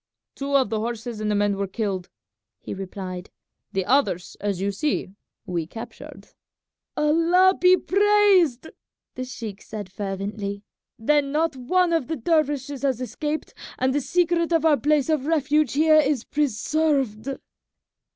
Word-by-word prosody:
"Two 280 0 -3
of 260 -5 +1
the 220 - 0
horses 230 0 -4
and 215 - -1
the 210 - +1
men 205 0 +2
were 200 0 -1
killed," 190 -3 -3 0.5
he - - -7
replied. 185 -1 -6 0.4
"The 190 -1 -1
others, 205 -8 +1
as 200 -3 -2
you 200 +1 0
see, 205 -2 -2 0.3
we 170 -3 -3
captured." 225 +4 -10 0.7
"Allah 335 +5 +4
be 365 +1 +6
praised!" 390 -9 +3 0.4
the 255 - -5
sheik 230 -5 -7
said 205 -4 -8
fervently; 200 +1 -4 0.3
"then 280 +4 +2
not 310 0 +1
one 340 +8 +1
of 325 -6 0
the 320 - -2
dervishes 290 -1 0
has 265 -4 0
escaped, 295 +4 -4 0.2
and 260 0 +1
the 290 - +1
secret 345 +2 +1
of 325 -1 +2
our 310 -2 +6
place 295 -1 +2
of 305 -3 0
refuge 305 -3 +2
here 310 +2 +5
is 285 -5 +1
preserved." 275 -3 0
270 Hz, 145 wpm, -24 LUFS, 210-310 Hz, 0.7 s, be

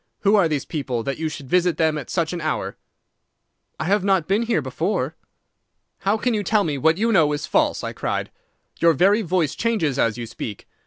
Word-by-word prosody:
Who 205 +1 +4
are 195 -5 +4
these 150 -3 -2
people, 130 -7 -3
that 140 +3 -3
you 160 -1 -1
should 145 -3 -8
visit 180 +1 +2
them 160 -1 +2
at 150 - -6
such 170 -1 -1
an 175 - -4
hour?' 125 -11 -2 1.0
"'I - - -1
have 195 +3 +1
not 190 -5 +2
been 200 +4 +2
here 235 0 +1
before.' - - -2 0.8
"'How 200 +3 +1
can 245 +2 0
you 210 - 0
tell 205 +1 +2
me 145 -5 -2
what 160 +4 +3
you 230 +3 +1
know 160 -8 +4
is 145 - -3
false?' - - +1
I - - -4
cried. - - -3 0.5
'Your 170 -1 +5
very 195 +8 +4
voice 175 -5 0
changes 180 - 0
as 115 0 +1
you 120 - -4
speak. 110 -2 -7
165 Hz, 210 wpm, -22 LUFS, 145-200 Hz, 1.0 s, Your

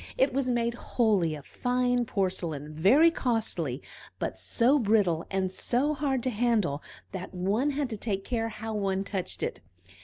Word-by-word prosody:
It 265 0 +3
was 265 -1 0
made 235 -1 +1
wholly 210 -9 +1
of 145 -2 -10
fine 245 0 0
porcelain, 170 -7 -2
very 255 - +5
costly, 215 - -1 0.3
but - - -3
so 260 +5 +2
brittle 200 -8 +2
and 190 -1 -1
so 250 +9 +1
hard 270 -4 -1
to 255 - 0
handle 215 -10 +1 0.3
that 190 0 -6
one 200 +10 +1
had 285 -1 -1
to 220 - -3
take 195 -2 -3
care 225 -2 -1
how 220 0 -6
one 195 -2 0
touched 195 -2 -4
it. - - -2
220 Hz, 160 wpm, -28 LUFS, 185-245 Hz, 0.3 s, very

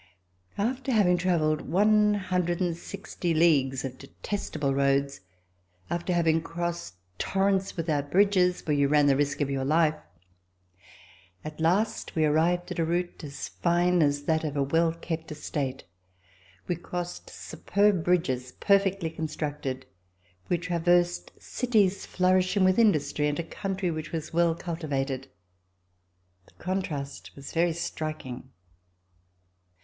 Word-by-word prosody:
After 255 +6 -1
having 190 -6 +4
travelled 160 -5 0
i6o 185 -3 +1
leagues 135 -6 +3
of 130 -1 -7
detestable 145 -1 -3
roads, 140 0 +1 0.7
after 170 +1 -1
having 165 -2 +3
VISITS 165 - -3
TO - - -11
LANGUEDOC 165 - -16
crossed 170 - -3 0.3
torrents 195 -1 0
without 150 -4 -1
bridges, 185 0 +3
where 150 - +1
you 140 -1 +3
ran 145 0 +4
the 140 -1 +4
risk 145 +1 0
of 140 -1 0
your 135 -1 -1
Hfe, 155 +2 +2 1.4
at 155 0 -7
last 200 +7 0
we 160 -1 +3
arrived 165 +4 +1
at - - -4
a - - +3
route 175 +1 -2
as 140 -1 -6
fine 175 0 +2
as 145 -1 +2
that 160 +2 +1
of 150 -2 -3
a 140 - +2
well 165 +4 +2
kept 165 -1 -5
estate. 140 -3 -4 0.8
We 175 - -1
crossed 175 0 -6
superb 200 -3 0
bridges 130 -8 0
perfectly 195 -4 +2
constructed. 150 -4 -4 0.6
We 175 - +2
traversed 175 +1 +1
cities 215 -6 +1
flourishing 185 +1 +2
with 185 +3 +4
industry 150 -9 +2
and 145 0 -1
a 170 - -2
country 190 +1 -3
which 155 -1 -5
was 160 -1 -5
well 170 -1 +3
cultivated. 140 -6 -3 1.2
The - - -24
contrast 155 -7 -4
was 140 0 -9
very 170 0 +2
striking. 155 -6 -5
165 Hz, 130 wpm, -27 LUFS, 145-180 Hz, 1.4 s, having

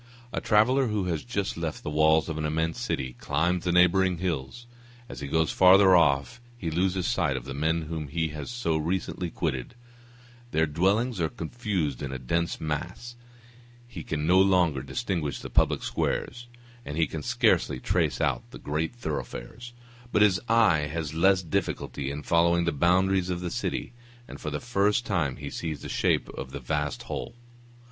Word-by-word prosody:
A - - -2
traveller 125 +5 +3
who 105 -3 -1
has 85 -4 -2
just 100 -7 -3
left 85 -2 -4
the - - -3
walls 80 +1 +4
of 80 -1 -4
an - - -2
immense 80 +2 -1
city, 65 -1 -2
climbs 85 +5 0
the 90 - +2
neighboring 90 +1 +4
hill; 80 -7 -2 0.6
as - - -8
he 70 - -5
goes 80 +2 +1
father 95 0 +7
off 80 - +2 0.2
he 85 -8 -3
loses 90 +2 0
sight 70 - +1
of - - -7
the 70 - -5
men 80 +4 0
whom 80 -1 -5
he 80 +3 -1
has 75 +6 -6
so 120 -10 -1
recently 90 +2 -2
quitted; 75 - -3 0.7
their 80 -8 +2
dwellings 95 +8 +1
are 80 - +1
confused 85 - -3
in 70 - -4
a 65 - -4
dense 85 +7 -1
mass; 90 +10 -4 0.7
he 115 -9 -8
can 75 0 -3
no 90 +3 +5
longer 90 -7 +3
distinguish 85 - -3
the - - -8
public - - +2
squares, 120 0 -2 0.4
and 75 - -6
he 80 - +3
can 80 - -6
scarcely 65 - +2
trace - - 0
out - - +1
the - - -10
great 80 +8 -3
thoroughfares; 110 - -6 0.4
but 105 - +4
his 95 -4 +3
eye 105 -10 +4
has 80 -2 -3
less 95 +3 +3
difficulty 70 -4 -2
in 70 +1 -5
following 85 +1 +3
the 85 - +1
boundaries 90 +4 +2
of 90 -1 -2
the 90 -1 -4
city, - - -3 0.3
and - - -10
for 75 - -3
the 75 0 -3
first 105 0 +1
time 80 -10 0
he 70 -1 -7
sees 80 -3 -5
the - - -5
shape - - +1
of 65 - -7
the 70 - -6
vast 75 +2 -2
whole. - - -5
85 Hz, 180 wpm, -27 LUFS, 75-95 Hz, 0.7 s, father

